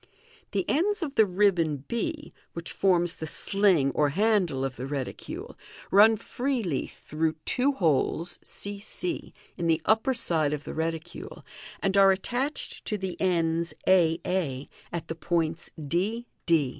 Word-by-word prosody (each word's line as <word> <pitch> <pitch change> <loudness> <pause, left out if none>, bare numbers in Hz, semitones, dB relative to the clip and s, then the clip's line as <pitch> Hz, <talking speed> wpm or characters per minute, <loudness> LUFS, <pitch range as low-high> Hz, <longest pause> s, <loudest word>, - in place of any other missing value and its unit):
The 195 -3 -1
ends 375 +5 +1
of 285 -4 -3
the 220 -6 +5
ribbon 175 -7 +2
I, 300 +6 -2 0.2
which 170 0 -6
forms 175 -3 +2
the 160 - -5
sling 185 -6 +3
or 150 +1 +2
handle 180 -6 +2
of 135 -2 -4
the 130 - -5
reticule, 135 -2 -5 0.4
run 215 +3 +7
freely 230 - -2
through 160 +1 -2
two 270 +3 +2
holes 165 - +1
c 200 0 -5
c 340 - -4 0.3
in 170 - -1
the 165 -1 +3
upper 220 +5 +3
side 160 - +1
of 150 -1 -3
the - - -6
reticule, 165 +1 -4 0.4
and 195 0 +1
are 195 0 +8
attached 245 +9 -2
to 210 - -1
the 190 -2 -4
ends 170 -2 +1
a 170 -3 +5
a 150 -8 -1 0.2
at 170 -1 -4
the - - -3
points 165 0 -1
d 185 +10 -1 0.2
d. 160 -6 +4
175 Hz, 150 wpm, -27 LUFS, 160-210 Hz, 0.4 s, are